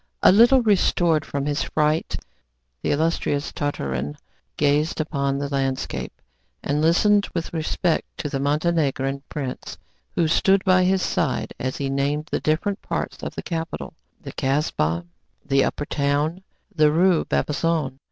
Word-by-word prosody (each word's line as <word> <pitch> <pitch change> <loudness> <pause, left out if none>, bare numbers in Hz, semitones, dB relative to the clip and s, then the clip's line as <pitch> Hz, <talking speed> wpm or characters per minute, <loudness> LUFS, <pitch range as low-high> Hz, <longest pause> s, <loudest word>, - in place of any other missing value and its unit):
A - - +8
little 240 +6 +6
restored 175 -6 +3
from 140 -1 -3
his 145 0 0
fright, 155 +1 0 0.7
the - - -2
illustrious 145 -1 0
Tartarin 70 - -3 0.4
gazed 150 +3 +1
on 140 -2 0
the 140 0 -2
landscape, 135 -2 -3 0.4
and 145 +1 0
listened 200 +6 +4
with 170 -1 -3
respect 165 +1 0
to - - -3
the 140 -1 -3
Montenegrin 140 -2 0
prince, 135 -4 -5 0.4
who 170 - +2
stood 195 +4 +3
by 185 -1 +4
his 190 0 +2
side, 140 -7 -1
as 130 +1 -3
he 140 - -2
named 140 +3 -1
the - - 0
different 195 +6 0
parts - - -4
of - - -6
the - - -5
capital, 165 -1 -4 0.3
the 135 - -9
Kasbah, 85 - 0 0.4
the 135 -1 +3
upper 145 - -2
town, 145 +1 +1
and 185 +3 -16 0.3
the 150 -2 +5
Rue 175 +1 +3
Bab - - 0
Azoon. 150 -4 -1
150 Hz, 150 wpm, -23 LUFS, 140-170 Hz, 0.7 s, A